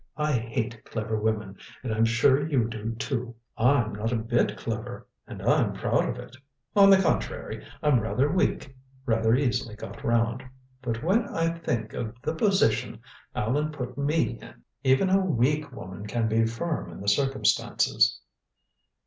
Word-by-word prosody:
I 150 0 +1
hate 115 -2 -2
clever 110 -1 -3
women, 105 -3 -2 0.3
and 115 -4 -2
I'm 110 +1 +3
sure 125 +5 +3
you 125 -7 +2
do, 115 0 -4
too. 120 +1 -3 0.2
I'm 120 -2 +2
not 110 +3 -2
a - - +1
bit 115 +2 0
clever, 115 +2 -5 0.2
and - - -8
I'm - - +3
proud - - 0
of - - -3
it. 130 - -10 0.4
On 200 -1 +8
the 195 -1 +7
contrary, 190 - -1 0.2
I'm 145 -5 +4
rather 120 +5 +1
weak 145 -5 0 0.3
rather 115 -2 +3
easily 120 -5 0
got 105 - -9
round. 115 +1 +1 0.4
But 115 -3 -3
when 200 +7 +2
I 165 0 0
think 115 -9 -2
of 115 0 -4
the 155 - -1
position 190 - +1 0.4
Allan 145 +8 0
put 125 -4 -5
me 145 -3 0
in - - -14 0.2
even 135 +9 +3
a 195 0 +4
weak 150 -2 +1
woman 100 -5 -8
can 115 +1 0
be 115 +1 +2
firm 150 +8 -3
in - - -10
the 100 - -8
circumstances." 135 +7 +2
120 Hz, 160 wpm, -27 LUFS, 110-145 Hz, 0.4 s, On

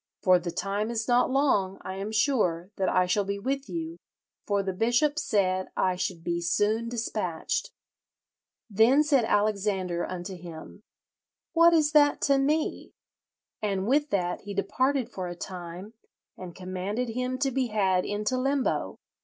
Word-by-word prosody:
For 185 -1 +5
the 175 0 -5
time 200 +5 -2
is 230 -1 -2
not 245 0 +3
long, 230 -9 +1
I 190 - -5
am 195 +3 -5
sure, 210 - +1
that 190 - +1
I 185 - +3
shall 195 +3 +1
be 200 +1 -3
with 270 +6 -3
you, 330 0 -5 0.5
for 200 -1 +1
the 190 -1 -2
bishop 240 +9 +2
said 185 -7 0
I 185 -1 +2
should 180 -2 -3
be 170 +1 -1
soon 215 +6 +1
despatched.' 225 - -2 1.0
Then 235 +7 +4
said 280 -6 +3
Alexander 200 -5 0
unto 185 +1 -5
him, 175 +2 -10 0.7
'What 335 0 +6
is 305 -2 +3
that 290 -1 +4
to 275 -1 +3
me?' 300 +3 -1 0.7
and 195 -3 -1
with 290 +5 +2
that 180 -6 -1
he 200 0 -7
departed 255 +6 0
for 185 -3 -5
a 175 - -6
time, 180 +3 -8 0.4
and 180 -2 -9
commanded 190 +6 -3
him 250 +2 -2
to 270 0 0
be 260 0 0
had 190 -4 +1
into 210 +5 -1
limbo. 270 0 0
210 Hz, 155 wpm, -27 LUFS, 185-260 Hz, 1.0 s, What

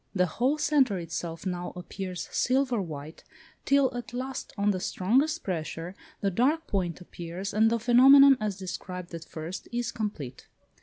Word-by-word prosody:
The 180 -1 +4
whole 250 - 0
centre 285 -8 +2
itself 165 0 -5
now 180 -1 -3
appears 180 0 -6
silver 255 -3 +1
white, 155 -2 -8 0.4
till 275 -2 +3
at 245 0 -6
last, 260 +1 -5
on 205 +1 +2
the 185 - -2
strongest 250 +13 +1
pressure, 165 -1 -4 0.3
the 195 - +1
dark 285 - +2
point 180 -5 -2
appears, 180 +3 -6
and 220 +2 +4
the 235 - +1
phenomenon, 270 +4 +7
as 210 -3 -2
described 180 -1 -6
at 165 -1 -6
first, 165 +3 -7
is 240 -1 -2
complete. 200 - -5
200 Hz, 155 wpm, -28 LUFS, 175-250 Hz, 0.4 s, phenomenon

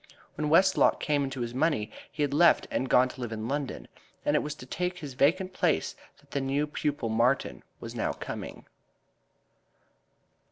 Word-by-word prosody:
When 150 -1 -2
Westlock 190 +4 +4
came 145 -2 +1
into 135 -2 -4
his 120 0 -3
money 130 -6 0 0.2
he 150 - -2
had 140 -1 -1
left 170 +4 +5
and 130 - -1
gone 130 +1 +5
to 130 - -10
live 120 -2 -4
in 110 0 -4
London, 140 +1 -3 0.4
and 145 - +2
it - - +3
was 150 0 -4
to 125 - -11
take 180 +6 -3
his 145 -6 -7
vacant 185 +8 +2
place 175 -3 +1 0.2
that 140 0 -26
the 140 - -1
new 135 +2 0
pupil 145 -4 -2
Martin 120 +5 +1 0.2
was - - -7
now - - -1
coming. - - -7
145 Hz, 175 wpm, -28 LUFS, 130-155 Hz, 0.4 s, left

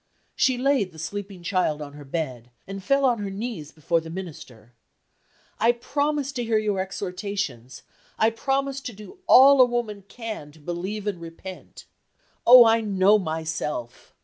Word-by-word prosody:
She 260 -1 +2
laid 260 -7 +1
the - - -14
sleeping 190 +3 -6
child 175 -5 0
on 145 -1 -8
her 145 0 -11
bed, 135 -5 -4 0.2
and 195 0 -7
fell 275 +6 +2
on 245 -3 +2
her 200 -1 -3
knees 195 -7 -6
before 165 +2 0
the 160 - -10
Minister: 145 - -9 0.9
"I 230 +2 +4
promise 285 +3 -1
to 245 -3 -3
hear 225 -1 +1
your 210 -3 0
exhortations 190 - -4 0.3
I 220 +1 +3
promise 270 +3 -1
to 245 - -6
do 215 - -13
all 270 +1 +8
a - - +8
woman 235 -5 -3
can 215 -10 -7
to 160 - -18
believe 180 +6 -5
and 195 -5 -3
repent. 170 +3 -10 0.6
Oh, 245 0 +10
I 225 0 +4
know 205 0 +3
myself! 155 - -4
200 Hz, 160 wpm, -24 LUFS, 165-240 Hz, 0.9 s, Oh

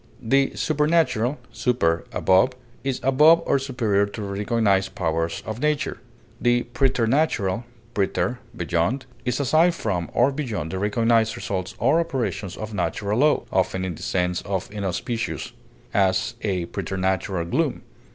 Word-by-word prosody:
The 135 +4 +2
supernatural 150 -5 +1
(super, 115 -9 +1
above) 95 +7 +3 0.3
is 135 -2 -1
above 155 +6 +6
or 140 - +2
superior 115 -7 +1
to 105 +2 -7
the 100 - -4
recognized 100 -1 +1
powers 80 -1 -1
of 110 +1 -5
nature; 150 -1 0 0.4
the 120 0 +3
preternatural 120 -4 +1 0.3
(preter, 115 +5 0 0.2
beyond) 90 +10 0 0.2
is 125 +1 0
aside 160 +6 +3
from 95 - -2
or 125 +4 +3
beyond 115 - -3
the 95 - -3
recognized 115 +2 +2
results 95 -1 -4
or 135 +8 +3
operations 110 - -2
of 110 0 -6
natural 100 +4 -1
law, 150 +1 +3
often 95 0 0
in 90 - -3
the - - -11
sense 90 -1 0
of 95 -1 -3
inauspicious; 105 +4 -3 0.4
as, 95 +3 +2
a 95 -5 -1
preternatural 95 -1 -2
gloom. 85 - -1
110 Hz, 135 wpm, -24 LUFS, 95-130 Hz, 0.4 s, above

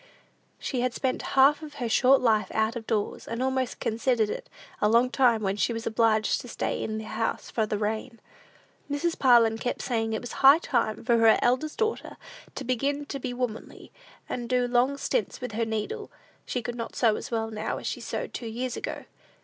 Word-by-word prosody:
She 250 - -3
had 250 -1 -1
spent 260 -1 -1 0.2
half 280 +4 +6
of 300 -2 -9
her 245 -4 -3
short 260 +4 +4
life 220 -3 +3
out 220 +1 +1
of 225 -2 -6
doors, 215 -3 -2
and 230 +2 -2
almost 260 -1 -1
considered 225 -1 +1
it - - -6 0.3
lost 235 +4 +3
time 240 -5 +3
when 195 0 0
she 235 - +1
was 230 0 -5
obliged 220 -1 +2
to - - -11
stay - - -3
in 215 0 -3
the 220 - -5
house 225 +1 -3
for 220 -2 0
the 210 - -1
rain. 220 +3 -3 0.7
Mrs. 310 +4 -1
Parlin 230 -4 +5
kept 245 - -3
saying 225 -3 -1
it 220 - -1
was 245 -2 -7
high 275 +2 +7
time 235 -10 -1
for 235 -1 +3
her 225 -1 +6
eldest 255 +5 +1
daughter 445 0 -2 0.4
to - - -4
begin 280 +4 -1
to 280 -1 -5
be 255 -1 -4
womanly, 245 -3 -5 0.4
and 240 -2 -4
do 250 -1 +2
long 250 +3 +2
stints 475 +9 -1
with 250 -2 -5
her 225 +2 -1
needle: 225 - -4 0.4
she 245 - -2
could 240 - -4
not 230 -1 -6
sew 225 -3 +3
as - - -6
well 225 -1 -2
now 215 0 -3
as - - -8
she - - -3
sewed - - -4
two 235 - -5
years 245 +3 -3
ago. - - -5
240 Hz, 205 wpm, -27 LUFS, 220-260 Hz, 0.7 s, high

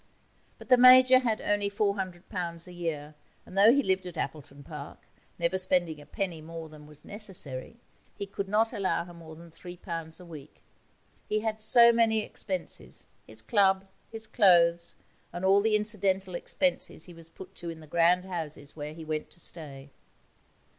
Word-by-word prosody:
But - - -14
the 250 - +7
Major 255 +1 +8
had 230 -4 -1
only 205 -1 0
£400 185 -4 -3
a - - -11
year, 160 -4 -5 0.3
and - - -13
though 205 +3 +7
he 280 +2 +3
lived 190 -2 0
at 175 -2 -9
Appleton 145 -2 -6
Park, 145 -1 -9 0.4
never 170 +2 0
spending 175 -5 0
a 145 - -16
penny 180 -3 -4
more 165 0 -8
than 150 -1 -14
was 150 -1 -17
necessary, 190 - -4 0.4
he 200 - -4
could 195 0 -5
not 225 +3 +2
allow 195 -5 -1
her 175 - -12
more 165 -2 -12
than 170 +1 -14
£3 165 -1 -7
a 180 - -12
week. 155 -4 -13 0.7
He 215 0 0
had 220 0 -3
so 235 +2 +6
many 225 -2 +3
expenses: 185 -4 -5 0.2
his - - -8
club, 195 -4 +3 0.3
his 225 0 -6
clothes, 170 -6 +3 0.4
and 175 +2 -4
all 195 +1 +5
the 215 0 +2
incidental 195 -3 0
expenses 270 +9 0
he 175 - -12
was 165 -1 -15
put 185 - -12
to 170 - -6
in 165 -1 -8
the 155 - -13
grand 170 +3 +2
houses 155 -5 -7
where 150 0 -7
he 160 -1 -9
went 155 -1 -4
to - - -11
stay. 145 -5 -4
180 Hz, 175 wpm, -28 LUFS, 160-205 Hz, 0.7 s, Major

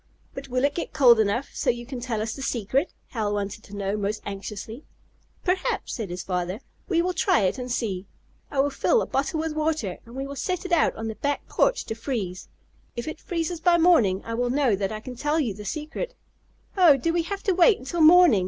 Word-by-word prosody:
"But 275 0 -7
will 255 0 -1
it 285 - +1
get 340 - -4
cold 245 -4 +6
enough 220 +5 +1
so 270 - -1
you 240 0 -1
can 255 0 -6
tell 235 -3 -2
us 220 0 -3
the 270 - -8
secret?" 260 - 0 0.2
Hal 210 -3 -1
wanted 205 +1 -4
to 205 - -10
know, 200 0 -1
most 210 +1 -2
anxiously. 205 +5 -6 0.6
"Perhaps," 370 0 0
said 220 -6 -4
his 180 +1 -5
father. 180 +2 -2 0.3
"We 340 -3 +3
will 365 +1 0
try 285 -9 +3
it 195 +6 0
and 250 0 -5
see. 200 -6 -2 0.4
I 270 - +2
will 285 +1 0
fill 465 - +2
a - - -3
bottle 310 +5 -1
with 320 0 -2
water, 305 - -1
and 235 - -12
we 270 +1 -3
will 280 +1 -7
set 365 +4 -2
it 370 - -5
out 335 -2 +3
on 225 - -4
the 220 - -3
back 285 +6 -2
porch - - +1
to - - -3
freeze. 220 -6 -4 0.5
If 235 +3 -5
it 315 0 -5
freezes 340 0 -2
by 345 +1 +4
morning 250 - +4
I 230 - -4
will 245 +1 0
know 260 -4 +2
that 195 0 -2
I 215 0 -5
can 250 +1 -8
tell 295 +5 0
you 245 -9 0
the 210 +1 -10
secret." 315 - -4 0.6
"Oh, 345 -7 +7
do 330 +6 0
we 340 - +2
have 395 +4 -5
to 395 -6 +2
wait 375 +4 +5
until 320 +6 -3
morning?" 330 - +7
255 Hz, 230 wpm, -25 LUFS, 215-320 Hz, 0.6 s, Oh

